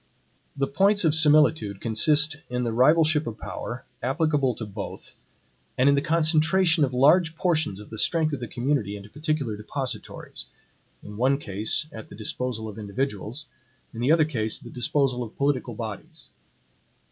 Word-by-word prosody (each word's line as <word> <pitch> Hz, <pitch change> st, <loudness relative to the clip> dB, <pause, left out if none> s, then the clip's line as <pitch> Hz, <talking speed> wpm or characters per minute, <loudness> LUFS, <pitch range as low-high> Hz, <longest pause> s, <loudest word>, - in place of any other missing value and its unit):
The 135 Hz, -, +1 dB
points 195 Hz, +7 st, +2 dB
of 155 Hz, -, +3 dB
similitude 150 Hz, -9 st, +3 dB
consist 145 Hz, +7 st, +2 dB
in 125 Hz, 0 st, -2 dB
the 115 Hz, -2 st, -2 dB
rivalship 155 Hz, +4 st, +3 dB
of 115 Hz, -1 st, -5 dB
power, 120 Hz, +2 st, -6 dB, 0.2 s
applicable 140 Hz, -1 st, +1 dB
to 110 Hz, -, -6 dB
both, 100 Hz, -1 st, -8 dB, 0.6 s
and 130 Hz, -, +3 dB
in 140 Hz, -, +6 dB
the 140 Hz, -, +2 dB
CONCENTRATION 165 Hz, +2 st, +3 dB
of 135 Hz, -, +1 dB
large 160 Hz, +6 st, +4 dB
portions 155 Hz, -, 0 dB
of 105 Hz, -, -12 dB
the 110 Hz, -, -5 dB
strength 160 Hz, -3 st, +2 dB
of 145 Hz, -, -2 dB
the 120 Hz, -, -5 dB
community 120 Hz, -5 st, -1 dB
into 100 Hz, +1 st, -13 dB
particular 150 Hz, -6 st, -2 dB
DEPOSITORIES, 130 Hz, +5 st, -6 dB, 0.6 s
in 105 Hz, 0 st, -10 dB
one 130 Hz, +4 st, +2 dB
case 110 Hz, +3 st, +2 dB
at 110 Hz, -, -10 dB
the -, -, -11 dB
disposal 110 Hz, +1 st, -3 dB
of 105 Hz, 0 st, -8 dB
individuals, 110 Hz, +4 st, -3 dB, 0.5 s
in 115 Hz, -, -8 dB
the 130 Hz, +5 st, +2 dB
other 160 Hz, -1 st, +5 dB
case 110 Hz, -8 st, -2 dB
at -, -, -16 dB
the 120 Hz, -, -10 dB
disposal 130 Hz, -1 st, 0 dB
of 115 Hz, -2 st, -7 dB
political 135 Hz, -4 st, -1 dB
bodies. 110 Hz, -3 st, -8 dB
135 Hz, 165 wpm, -25 LUFS, 110-155 Hz, 0.6 s, in